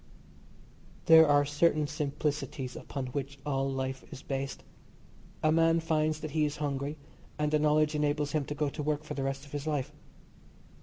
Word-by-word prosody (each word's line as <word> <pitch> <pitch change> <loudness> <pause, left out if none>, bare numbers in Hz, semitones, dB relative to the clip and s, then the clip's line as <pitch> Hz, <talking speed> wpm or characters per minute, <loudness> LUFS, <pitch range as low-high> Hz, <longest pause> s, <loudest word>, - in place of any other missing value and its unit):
There 160 -1 +8
are 145 0 +4
certain 150 +1 +2
simplicities 145 -3 -3
upon 135 -2 -5
which 140 0 -4
all 135 -1 0
life 130 0 -3
is 130 - -9
based. 135 0 -4 0.8
A 155 - +4
man 165 +1 +4
finds 155 -1 0
that 155 - -5
he 155 +1 +1
is 150 0 -1
hungry 145 0 -2 0.4
and 150 0 0
the 155 - +3
knowledge 150 0 +3
enables 150 -1 0
him 155 -3 0
to 145 - -5
go 150 0 0
to 140 - -4
work 150 0 -1
for 150 - -6
the 140 - -3
rest 135 +1 -3
of 140 - -16
his 145 +1 -4
life. 145 -4 -1
150 Hz, 175 wpm, -30 LUFS, 140-155 Hz, 0.8 s, There